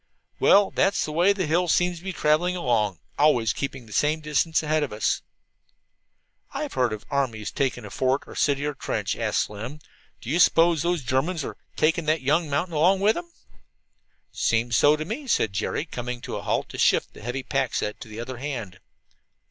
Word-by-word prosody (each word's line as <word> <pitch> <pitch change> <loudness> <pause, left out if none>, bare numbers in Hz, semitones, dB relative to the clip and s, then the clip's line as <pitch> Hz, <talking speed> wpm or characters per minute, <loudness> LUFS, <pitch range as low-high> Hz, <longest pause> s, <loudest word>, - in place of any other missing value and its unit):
"Well, 200 -1 +5
that's 195 - +1
the 155 - -5
way 175 +6 +4
that 195 -3 -1
hill 170 +4 +1
seems 180 +1 +1
to - - -18
be 190 - -3
traveling 175 +2 +1
along, 115 - 0 0.2
always 130 -7 +4
keeping 135 -3 -5
the 105 - -12
same 150 +6 +2
distance 155 +2 +1
ahead 155 0 +1
of 145 - -2
us." 105 0 0 1.3
"I've - - -3
heard 125 -3 +1
of 110 -1 -6
armies 120 -7 -1
'taking' 125 -4 -1
a 105 - -9
fort, 130 +2 0
or - - -13
a - - -14
city, 145 0 +1
or 150 - 0
a - - -13
trench," - - -3
said - - -1
Slim. 110 +8 -3 0.4
"Do 120 - -6
you 170 - +1
suppose 165 -2 +5
those 170 -3 0
Germans 140 +5 0
are - - -6 0.2
'taking' 160 +1 +1
that 155 -1 +1
young 150 +4 +1
mountain 150 +5 -1
along 175 +6 +3
with 205 +3 +4
them?" 345 +4 -7 1.0
"Seems 115 0 0
so 145 +6 +5
to 155 0 -5
me," 250 - -5
said 110 - +1
Jerry, 95 - -2
coming 125 -5 -5
to - - -5
a - - -4
halt - - -1
to - - -8
shift - - +2
the - - -13
heavy 125 +3 -4
pack 135 -2 -1
set 105 - -2
to - - -8
the 110 +1 -9
other 125 +2 -6
hand. 120 -9 -5
145 Hz, 205 wpm, -25 LUFS, 120-165 Hz, 1.3 s, Well